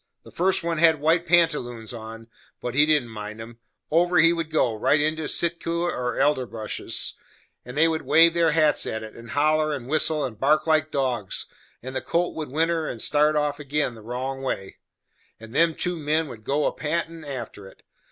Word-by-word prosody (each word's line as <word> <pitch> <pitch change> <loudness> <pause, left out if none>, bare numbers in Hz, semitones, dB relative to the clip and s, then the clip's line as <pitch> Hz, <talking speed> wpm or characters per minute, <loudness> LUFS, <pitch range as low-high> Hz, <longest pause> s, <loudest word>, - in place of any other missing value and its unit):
The - - -14
first 190 +1 0
one 165 -1 -1
had 160 -2 +5
white 165 +3 +2
pantaloons 150 -10 +1
on, 115 0 -9 0.3
but 125 - -4
he 145 +3 +4
didn't 150 -6 +2
mind 105 0 -7
'em; 115 +1 -10 0.3
over 175 +3 +3
he 165 +1 +6
would 165 -2 -3
go, 140 -7 +1
right 140 +7 +2
into 155 +1 0
sikuta 170 0 0
or 125 0 -3
elderbushes, 125 -7 -1 0.5
and 125 +3 -9
they 160 +2 +5
would 160 -1 -1
wave 165 +2 +5
their 170 -1 +3
hats 155 -2 +2
at 110 0 -4
it, 110 - -10
and 115 0 -12
holler, 155 +2 +2
and 135 -5 -5
whistle, 155 0 +1
and 110 -5 -7
bark 150 +4 +3
like 155 -1 +2
dogs, 125 -9 -1 0.4
and 130 +1 -7
the 130 - -1
colt 175 +1 -1
would 155 -3 -5
whinner 160 +2 0
and 115 - -5
start 150 +4 +2
off 150 -1 0
again 145 0 -1
right 120 - -13
the 110 - -15
wrong 130 +2 -4
way, 95 -7 -4 0.6
and 110 +1 -12
them 165 -1 +3
two 180 -1 -2
men 155 +1 0
would 115 -5 -10
go 145 +6 0
a - - +2
pantin' 165 +1 -3
after 120 -8 -7
it. - - -18
150 Hz, 200 wpm, -24 LUFS, 125-160 Hz, 0.6 s, he